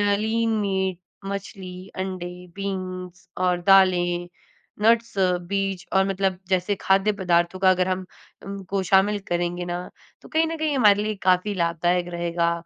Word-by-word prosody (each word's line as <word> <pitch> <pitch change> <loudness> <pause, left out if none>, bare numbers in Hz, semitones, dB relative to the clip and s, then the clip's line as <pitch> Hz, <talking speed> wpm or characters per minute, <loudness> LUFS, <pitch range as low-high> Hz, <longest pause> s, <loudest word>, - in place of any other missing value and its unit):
Lean 225 +2 0
meat 190 -3 -1 0.3
मछली, 190 -1 -6
अंडे, 185 -1 -4 0.3
beans 185 -2 -5
और 180 -1 +1
दालें, 175 -2 +4 0.5
नट्स, 230 +1 +3
बीज 185 +1 0
और 190 0 +4
मतलब 190 -1 0
जैसे 185 +2 +1
खाद्य 195 +2 +3
पदार्थों 180 -2 +1
का 190 - +5
अगर 185 0 +1
हम 185 0 -2 0.4
उन 195 0 -6
को 195 -1 0
शामिल 195 +2 +3
करेंगे 175 0 -1
ना 175 +1 -4 0.3
तो - - -14
कहीं 320 +1 +2
न 325 0 -4
कहीं 310 -2 0
हमारे 210 -4 +5
लिए 215 0 -2
काफ़ी 185 +3 +2
लाभदायक 175 0 0
रहेगा। 170 0 0
190 Hz, 145 wpm, -24 LUFS, 180-200 Hz, 0.5 s, का